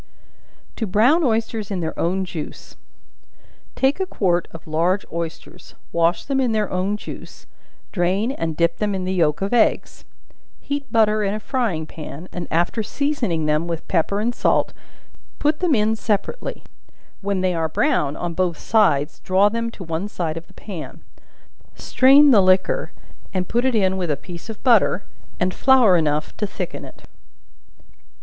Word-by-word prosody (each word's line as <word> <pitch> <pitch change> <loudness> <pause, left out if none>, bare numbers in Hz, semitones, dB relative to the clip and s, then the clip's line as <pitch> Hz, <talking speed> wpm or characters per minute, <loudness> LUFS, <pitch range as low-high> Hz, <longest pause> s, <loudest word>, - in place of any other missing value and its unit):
To 225 - -2
Brown 245 - +4
Oysters 225 -4 -1
in 195 -3 -2
their 160 -2 -3
own 185 +3 0
Juice. 165 -4 -8 1.0
Take 270 +6 +1
a 380 - -1
quart 180 - 0
of 165 - -11
large 170 +5 0
oysters, 165 -1 -7 0.2
wash 170 +1 +1
them 270 -1 0
in 245 -3 +1
their 215 -2 0
own 190 +3 -1
juice, - - -10 0.5
drain 190 +6 0
and 165 - -3
dip 170 0 +2
them 210 -2 -1
in 185 - -3
the 185 +1 -2
yelk 165 -1 +1
of 200 - -2
eggs; 235 -2 +1 0.6
heat 285 0 -5
butter 215 -2 +3
in 200 0 0
a - - -3
frying 215 - -1
pan, 155 +1 -9
and 175 -2 -5
after 175 +7 0
seasoning 230 - -1
them 155 +2 +1
with 165 -1 -5
pepper 190 +3 0
and 235 +3 0
salt, - - +1 0.6
put 300 +1 +1
them 345 -6 +2
in 215 0 +2
separately; 230 - -3 0.6
when 200 -2 -1
they 185 -1 +1
are 165 -1 -1
brown 155 - +1
on 175 -1 -4
both 175 -2 0
sides, 150 -10 +2
draw 190 +2 +3
them 230 +1 -2
to 220 - -10
one 165 +3 -3
side 170 -6 -3
of 165 0 -8
the 190 - -20
pan; 190 -7 -8 0.7
strain 275 +2 +5
the 215 -5 +7
liquor, 185 - +2 0.4
and 185 -1 -1
put 240 +2 0
it 260 -2 +1
in 190 -3 +2
with 180 -3 -2
a 145 - 0
piece 175 +3 -10
of 220 - -8
butter 225 -6 +3 0.4
and 180 0 0
flour 255 -8 +5
enough 155 -2 0
to 210 - -1
thicken 180 -2 -6
it. - - -14
195 Hz, 170 wpm, -21 LUFS, 170-225 Hz, 1.0 s, the